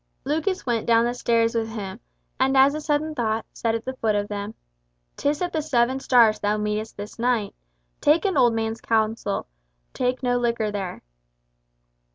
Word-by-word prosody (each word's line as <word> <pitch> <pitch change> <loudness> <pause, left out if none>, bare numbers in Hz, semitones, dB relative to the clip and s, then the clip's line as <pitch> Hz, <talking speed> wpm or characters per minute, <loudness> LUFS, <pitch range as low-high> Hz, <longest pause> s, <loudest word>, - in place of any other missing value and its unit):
Lucas 320 +7 -1
went 235 -3 -1
down 230 0 +4
the 240 - 0
stairs 230 -2 +1
with 225 -1 -1
him, 205 -4 -6 0.4
and 265 +1 +3
as 270 +2 +6
a 305 - -4
sudden 305 +1 0
thought, 225 -5 -1
said 230 -1 -1
at 230 - -5
the 260 0 -4
foot 220 -3 +1
of 205 0 -1
them, 205 +1 -5 0.6
"'Tis 290 +4 0
at 355 - -3
the 315 - 0
Seven 260 -3 +1
Stars 235 -5 +4
thou 210 +1 0
meetest 210 +1 -3
this 205 +2 -8
knight. 235 -4 0 0.5
Take 310 +6 +3
an 385 - +1
old 240 -2 +4
man's 225 0 -2
counsel. 220 -2 0 0.5
Taste 255 +1 -1
no 245 -1 +2
liquor 235 -3 0
there." 195 -3 -5
230 Hz, 180 wpm, -24 LUFS, 220-265 Hz, 0.6 s, as